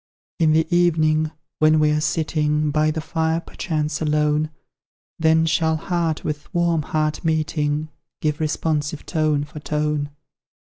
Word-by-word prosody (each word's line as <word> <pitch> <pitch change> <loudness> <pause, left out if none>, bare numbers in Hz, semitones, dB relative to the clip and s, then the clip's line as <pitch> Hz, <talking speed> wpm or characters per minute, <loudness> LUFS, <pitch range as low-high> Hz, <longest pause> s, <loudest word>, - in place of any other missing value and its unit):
In 160 -2 +4
the 160 0 +3
evening, 155 -3 +3 0.3
when 155 0 +5
we're 150 0 +2
sitting 155 -1 0
By 155 +1 +2
the 160 +1 -2
fire, 160 0 0
perchance 155 -4 -3
alone, 150 0 +1 0.7
Then 160 0 +4
shall 160 0 +2
heart 165 -1 -1
with 150 -1 -5
warm 170 -2 +2
heart 155 +1 -1
meeting, 155 -1 0 0.3
Give 150 0 -1
responsive 155 -1 -1
tone 155 -3 +1
for 150 +1 -9
tone. 150 -1 -1
155 Hz, 130 wpm, -22 LUFS, 150-160 Hz, 0.7 s, when